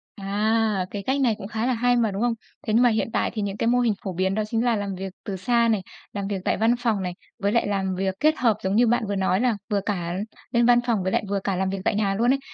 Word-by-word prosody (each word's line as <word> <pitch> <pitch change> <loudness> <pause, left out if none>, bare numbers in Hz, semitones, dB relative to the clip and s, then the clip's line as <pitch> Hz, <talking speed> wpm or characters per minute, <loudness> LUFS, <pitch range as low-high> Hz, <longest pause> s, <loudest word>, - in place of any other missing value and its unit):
À, 210 0 0
cái 200 -1 -5
cách 270 +4 0
này 235 -5 +3
cũng 195 - -7
khá 225 +1 -2
là 255 - +2
hay 245 +1 +2
mà, 230 -3 +2
đúng 195 +2 -3
không? 240 0 +2 0.3
Thế 215 - +1
nhưng 235 - +5
mà 245 - +6
hiện 220 0 0
tại - - +1
thì 220 - -2
những 200 0 -3
cái 230 - 0
mô 245 +1 +3
hình 235 -3 +2
phổ 190 - -3
biến 190 +2 0
đó 215 - 0
chính 225 +1 0
là 235 - +3
làm 200 -2 -3
việc 190 0 -6
từ 200 - -3
xa 235 +3 +2
này, 210 -3 +1 0.3
làm 200 -1 -3
việc 195 -2 -3
tại - - +1
văn 225 +2 +3
phòng 225 -5 0
này, 180 - -3 0.3
với 200 0 +1
lại 235 -2 +2
làm 190 -2 -1
việc 190 0 -1
kết 310 +4 +4
hợp, 230 -4 +2
giống 190 +1 0
như 235 +1 +5
bạn 240 0 +2
vừa 200 - -1
nói 190 0 +1
là 245 -4 +2
vừa 205 -2 +1
cả 175 -5 -2 0.4
lên 235 -1 +3
văn 240 0 +6
phòng 215 -6 +1
với 185 - -1
lại - - +1
vừa 200 0 0
cả 195 0 -2
làm 190 +1 0
việc 195 0 -3
tại - - +2
nhà 200 -2 +1
luôn 240 +4 +3
ấy, 275 - -1
210 Hz, 305 wpm, -24 LUFS, 195-235 Hz, 0.4 s, mà